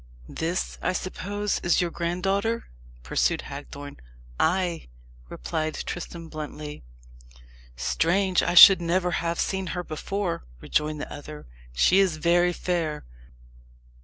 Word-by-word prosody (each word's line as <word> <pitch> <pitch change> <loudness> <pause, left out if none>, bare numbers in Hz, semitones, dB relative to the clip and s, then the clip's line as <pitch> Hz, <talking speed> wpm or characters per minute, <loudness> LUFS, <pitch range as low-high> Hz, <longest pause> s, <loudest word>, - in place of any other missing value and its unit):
"This, 170 +3 -3
I - - 0
suppose, 200 +3 -3
is 175 - +2
your 175 -1 0
granddaughter?" 195 +7 -1 0.4
pursued - - 0
Hagthorne. 145 0 -9 0.4
"Ay," 175 0 0 0.4
replied 155 - -3
Tristram 170 -1 -6
bluntly. 150 -1 -7 0.9
"Strange 170 - +1
I - - -1
should 185 +1 +11
never 180 +1 +1
have 170 -1 -1
seen 190 -1 -1
her 180 - -2
before," 175 - -3 0.2
rejoined 150 - -1
the - - -6
other. 150 +1 -9 0.3
"She 175 - +4
is 185 -5 +2
very 175 +2 +3
fair. 170 -4 -2
170 Hz, 115 wpm, -26 LUFS, 155-185 Hz, 0.9 s, should